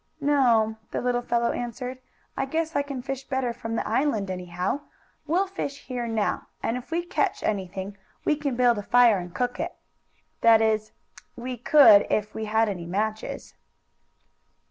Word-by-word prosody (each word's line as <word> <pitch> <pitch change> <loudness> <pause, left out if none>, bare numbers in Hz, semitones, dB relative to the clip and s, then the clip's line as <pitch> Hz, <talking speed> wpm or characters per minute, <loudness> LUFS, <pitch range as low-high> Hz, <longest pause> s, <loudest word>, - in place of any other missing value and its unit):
"No," 240 -7 +3
the - - -3
little 245 0 0
fellow 235 -1 +1
answered. 250 +2 -5 0.4
"I 270 - -1
guess 320 +3 -2
I 285 - +3
can 280 -3 -6
fish 270 0 -4
better 260 -3 -2
from 225 -1 -5
the - - -2
island, 220 -5 0
anyhow. 180 +6 -3 0.5
We'll 360 +5 +2
fish 320 -7 -6
here 245 -2 -3
now, 225 -2 -1 0.2
and 225 - 0
if 250 0 -7
we 340 +1 -1
catch 365 - -1
anything 195 0 -3 0.3
we 305 - +3
can 285 -3 -2
build 240 -3 +3
a - - -3
fire 235 -1 +5
and 175 0 -7
cook 245 +6 -2
it. 335 +2 -3 0.7
That 230 -1 +7
is, 220 -1 +1 0.4
we 250 +1 -5
could 240 -4 +7
if 210 0 0
we 220 - -4
had 220 +1 +2
any 180 -5 -4
matches." 215 +4 -3
240 Hz, 165 wpm, -26 LUFS, 215-270 Hz, 0.7 s, That